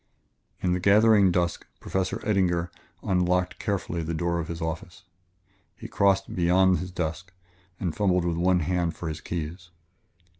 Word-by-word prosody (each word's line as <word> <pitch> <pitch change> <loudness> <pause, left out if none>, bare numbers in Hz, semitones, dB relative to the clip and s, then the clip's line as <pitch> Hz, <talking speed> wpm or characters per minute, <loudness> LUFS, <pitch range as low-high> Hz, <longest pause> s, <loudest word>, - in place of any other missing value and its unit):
In 90 -1 +2
the 90 - 0
gathering 100 0 +5
dusk 85 -1 -1
Professor 95 -1 -2
Eddinger 90 -5 +1 0.3
locked 90 -2 0
carefully 95 -5 -2
the 80 +1 -3
door 85 +1 -1
of 80 - -4
his 85 -1 -5
office. 80 +4 -5 0.7
He - - -9
crossed 95 -1 +1
beyond 90 +1 +3
his 90 - -5
desk 90 0 -4 0.5
and 85 -5 -2
fumbled 90 -4 +1
with 85 -1 0
his 85 - -1
one 90 -1 +3
hand 85 +1 -1
for 85 - -5
his 75 0 -6
keys. 85 +1 -5
90 Hz, 155 wpm, -26 LUFS, 85-95 Hz, 0.7 s, gathering